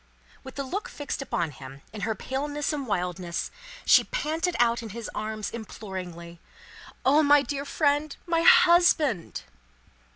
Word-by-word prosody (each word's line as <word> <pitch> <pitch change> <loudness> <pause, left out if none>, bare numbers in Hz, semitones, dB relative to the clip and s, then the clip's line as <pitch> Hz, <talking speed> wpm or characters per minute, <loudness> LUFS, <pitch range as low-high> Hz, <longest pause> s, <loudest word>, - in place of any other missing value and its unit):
With 265 - -10
the 280 - -3
look 405 - -4
fixed 290 - -5
upon 170 - -2
him, 135 0 -12
in 215 - -7
her 220 +1 -1
paleness 290 +6 -3
and 280 -3 -4
wildness, 180 -3 -2 0.3
she - - +7
panted 345 -6 -2
out 235 -1 +3
in 225 - -7
his 230 +2 -7
arms, 215 0 -4
imploringly, 180 -6 -8 0.7
"O 290 +4 +5
my 290 -1 +5
dear 280 0 -4
friend! 290 0 0
My 335 -1 +1
husband!" 345 - +4
265 Hz, 140 wpm, -26 LUFS, 200-300 Hz, 0.7 s, she